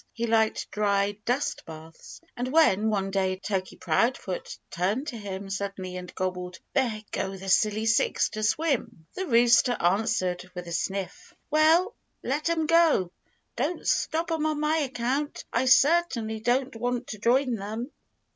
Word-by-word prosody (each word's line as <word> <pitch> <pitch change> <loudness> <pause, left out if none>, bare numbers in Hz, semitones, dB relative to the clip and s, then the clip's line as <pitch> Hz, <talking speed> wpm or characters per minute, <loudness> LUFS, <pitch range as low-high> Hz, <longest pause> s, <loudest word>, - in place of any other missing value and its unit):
He 235 - -2
liked 220 -1 +1
dry 200 0 0
dust 250 +4 -1
baths. 160 0 -11
And 245 +1 -3
when, 220 -9 +4
one 195 -2 -1
day, 190 -1 0
Turkey 190 -1 -3
Proudfoot 185 +2 -1
turned 200 - -1
to - - -7
him 200 -2 -6
suddenly 195 -2 -4
and 180 -1 -7
gobbled, 180 0 -3 0.2
"There 235 -6 0
go 195 0 -3
the 190 +1 -7
Silly 215 +3 +2
Six 225 0 +2
to 215 - -6
swim!" 235 - -1
the 380 0 -4
rooster 240 -1 +4
answered 185 -1 0
with 180 0 -6
a - - -7
sniff, 190 +3 -4 0.2
"Well, 325 +7 +4 0.3
let 295 +6 -1
'em 325 -2 +1
go! 325 - +3 0.4
Don't 305 +8 -2
stop 330 +2 0
'em 315 -1 0
on 305 -1 -1
my 305 +1 +1
account. 270 0 -2
I 240 +3 +2
certainly 260 -6 +3
don't 250 +3 0
want 245 +2 -2
to 215 - -6
join 250 +3 +2
them." 220 +5 -5
225 Hz, 155 wpm, -27 LUFS, 195-270 Hz, 0.4 s, when